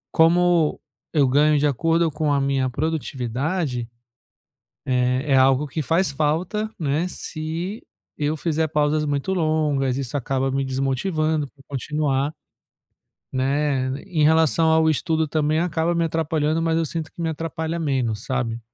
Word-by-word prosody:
como 170 -1 +4 0.3
eu 145 -4 +3
ganho 150 +3 +4
de 145 - +2
acordo 165 +4 +2
com 150 -1 -1
a 140 - +2
minha 135 -1 +1
produtividade, 135 -1 -2 1.0
eh, 125 +1 +1
é - - +6
algo 135 +2 +4
que 155 +2 -3
faz 165 +1 +1
falta, 165 +9 -1
né, 155 +2 0
se 170 +4 -5 0.3
eu 150 +1 0
fizer 160 0 0
pausas 150 0 +1
muito 145 +6 -1
longas 150 -6 +1
isso 135 +1 -4
acaba 135 +1 -1
me 135 0 0
desmotivando 150 +4 0
pra 135 0 -22
continuar, 145 +1 -1 1.0
né, 135 0 0 0.2
em 160 -4 0
relação 160 +1 +4
ao 160 0 +4
estudo 160 +1 0
também 155 +1 0
acaba 170 0 0
me 170 0 +1
atrapalhando 160 -1 0
mas 165 -1 +1
eu 165 - +1
sinto 160 0 -4
que - - -12
me 165 - 0
atrapalha 165 +1 -3
menos, 130 -8 -1
sabe, 120 -4 -2
150 Hz, 145 wpm, -23 LUFS, 135-160 Hz, 1.0 s, é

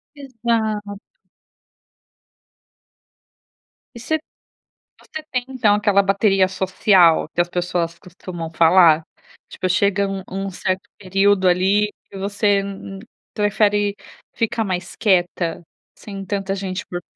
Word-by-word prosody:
Exato. 225 -6 -2 3.0
E 235 - -8
você 315 +7 -1 0.8
você 315 - -9
tem 255 -1 -1
então 230 -6 +2
aquela 205 -1 +3
bateria 195 -1 +2
social 185 -3 +3
que 175 - 0
as 175 - -8
pessoas 175 -1 -2
costumam 175 -2 -8
falar, 165 -1 +5 0.5
tipo 185 - -3
chega 200 +2 +1
um 195 -1 -4
um 195 +1 -4
certo 185 +1 -3
período 195 0 +2
ali, 195 +4 +2 0.2
e 195 - -9
você 200 0 +1 0.7
prefere 205 -1 +1 0.4
ficar 225 -1 -1
mais 185 -2 -4
quieta, 175 -4 0 0.3
sem 195 -2 -9
tanta 195 0 -2
gente 190 -1 -5
por 175 - -5
195 Hz, 110 wpm, -20 LUFS, 185-205 Hz, 3.0 s, falar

